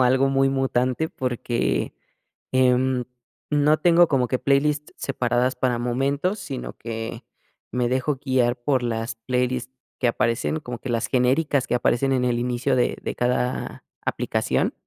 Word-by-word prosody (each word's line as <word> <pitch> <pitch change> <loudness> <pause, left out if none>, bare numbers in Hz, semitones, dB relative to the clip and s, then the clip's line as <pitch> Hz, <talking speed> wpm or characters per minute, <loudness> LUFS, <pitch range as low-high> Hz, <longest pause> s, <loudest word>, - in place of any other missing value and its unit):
Como - - +5
algo 130 +2 +3
muy 135 0 +3
mutante, 135 +2 0
porque, 120 -2 -1 0.6
em, 130 0 +3 0.5
no 150 +1 +4
tengo 170 +1 +5
como 130 -3 +2
que 130 +1 -1
playlist 150 +2 +1
separadas 125 -1 0
para 125 -1 0
momentos, 140 - 0
sino, 135 -8 -6
que 115 0 -5 0.5
me 125 -1 +1
dejo 130 +2 0
guiar 125 -2 +2
por 130 +1 0
las 115 -1 -2
playlist 125 0 0 0.3
que 125 - +3
aparecen, 120 +7 0
como 125 -4 -6
que 130 - -7
las 115 -1 0
genéricas 135 +2 +2
que 120 - -1
aparecen 130 +2 +2
en 125 -1 +1
el 120 -1 +1
inicio 125 +2 0
de 125 - +1
de - - -3
cada 125 0 -1 0.2
aplicación. - - 0
130 Hz, 150 wpm, -24 LUFS, 120-135 Hz, 0.6 s, Como